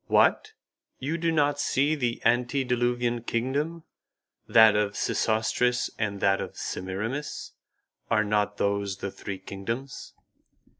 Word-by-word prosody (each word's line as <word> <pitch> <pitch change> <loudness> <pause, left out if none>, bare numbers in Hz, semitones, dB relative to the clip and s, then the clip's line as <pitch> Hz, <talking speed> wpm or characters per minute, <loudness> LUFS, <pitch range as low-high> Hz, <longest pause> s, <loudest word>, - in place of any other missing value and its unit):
"What! - - +3 0.4
You 155 +6 -3
do 165 0 +1
not 145 -2 +2
see 145 +3 +2
the 125 -6 -2
antediluvian 120 -1 +1
kingdom, 140 +9 -2 0.6
that 110 -2 +7
of 105 -1 0
Sesostris 120 +3 +1
and 105 -2 -1
that 95 0 +3
of - - -7
Semiramis? 110 +10 -4 0.6
Are 110 -2 +3
not 105 0 0
those 100 -1 0
the 95 0 -5
three 100 0 -6
kingdoms?" 115 +8 -6
120 Hz, 115 wpm, -27 LUFS, 105-135 Hz, 0.6 s, that